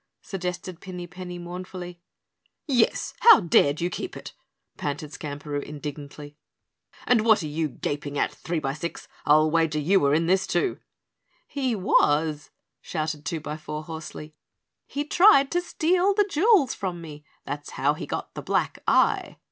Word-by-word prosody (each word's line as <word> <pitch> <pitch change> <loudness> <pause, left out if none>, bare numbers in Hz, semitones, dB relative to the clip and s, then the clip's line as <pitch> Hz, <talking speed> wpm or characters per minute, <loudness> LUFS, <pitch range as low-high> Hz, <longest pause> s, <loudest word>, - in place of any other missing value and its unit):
suggested 180 -2 -5
Pinny 180 -2 -7
Penny 180 0 -8
mournfully. 175 0 -8 0.6
"Yes, 255 -7 +1
how 465 - +9
dared 155 -5 +3
you 175 +1 0
keep - - -5
it?" - - -9 0.4
panted 145 +1 -4
Skamperoo 145 -1 -5
indignantly. 145 0 -8 0.7
"And 245 -3 +4
what 220 -5 +4
are - - -3
you 155 +1 -2
gaping 145 +1 -4
at, - - +1
Threebysix? 155 0 -4 0.2
I'll 155 +1 +5
wager 160 -2 +2
you 180 +7 +3
were 140 +1 +3
in 165 +1 +2
this, 190 +3 +2
too." 390 - 0 0.7
"He 260 -5 -1
was," 155 -5 +2 0.3
shouted 155 -2 -4
Twobyfour 155 -2 -5
hoarsely. 160 -1 -8 0.5
"He 285 - -3
tried 325 -4 +6
to 350 - +1
steal 360 +3 +1
the 415 0 +4
jewels 365 - +4
from 185 -3 -4
me. 150 -3 -10 0.2
That's 145 +1 -5
how - - +2
he - - -7
got - - -5
the - - -6
black - - -1
eye." - - +2
170 Hz, 145 wpm, -25 LUFS, 150-200 Hz, 0.7 s, how